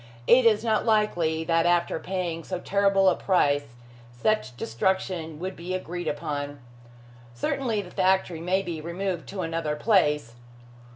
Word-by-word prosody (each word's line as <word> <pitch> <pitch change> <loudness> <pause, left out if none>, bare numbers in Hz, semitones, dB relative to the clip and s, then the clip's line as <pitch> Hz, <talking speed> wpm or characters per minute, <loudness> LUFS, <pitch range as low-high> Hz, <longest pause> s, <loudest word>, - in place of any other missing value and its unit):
It 245 - +6
is 215 -1 +3
not 220 -2 +1
likely 175 -8 +1
that 165 +1 +2
after 175 -1 +2
paying 175 -3 -3
so 185 - -4
terrible 195 0 +2
a 185 - +5
price, 145 -8 +1 0.4
such 130 - 0
destruction 165 +5 -1
would 185 +4 -5
be 175 +2 -4
agreed 175 -2 -5
upon. 145 -1 -3 0.8
Certainly 220 - -1
the 180 - -12
factory 185 -3 +1
may 185 +3 +1
be 170 -4 -5
removed 175 +2 -4
to 195 -1 -4
another 165 -3 -2
place. 150 - +2
175 Hz, 140 wpm, -26 LUFS, 160-195 Hz, 0.8 s, It